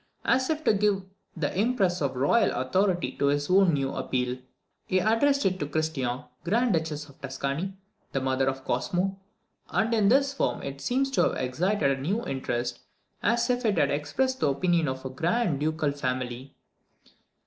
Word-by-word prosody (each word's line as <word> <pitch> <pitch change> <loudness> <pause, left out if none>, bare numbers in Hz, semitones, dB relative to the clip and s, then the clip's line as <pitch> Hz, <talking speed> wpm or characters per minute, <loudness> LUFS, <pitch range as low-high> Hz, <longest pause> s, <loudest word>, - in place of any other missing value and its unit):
As 260 0 +2
if 315 0 -1
to - - +4
give 200 -1 +1 0.3
the 150 -3 -2
impress 195 -4 +1
of 140 -2 -1
royal 170 - +3
authority 175 +1 +1
to 140 - +2
this 145 +3 0
new 165 -8 +4
appeal, 125 0 -2 0.5
he 185 - +2
addressed 230 +9 +3
it 185 -1 +1
to 145 - -2
Christian, 145 -4 -2 0.2
Grand 225 +6 +2
Duchess 155 -2 -2
of 140 - -19
Tuscany, 140 +7 -3 0.4
the 135 - 0
mother 130 0 0
of 135 0 -2
Cosmo; 180 +10 -1 0.5
and 230 +1 +1
in 210 -3 +4
this 275 +3 +3
form - - -1
it 140 0 -6
seems 270 - 0
to - - +2
have - - +2
excited 140 +5 +1
a 135 -1 -2
new 200 - -1
interest, 120 -2 -2 0.4
as 235 +2 +2
if 245 0 -1
it 215 -3 +1
had 140 - +3
expressed 260 - -1
the - - +2
opinion 165 +3 +1
of 130 0 -3
the 130 - -4
grand 170 - 0
ducal 155 -1 0
family. 130 -1 -4
160 Hz, 170 wpm, -27 LUFS, 135-210 Hz, 0.5 s, to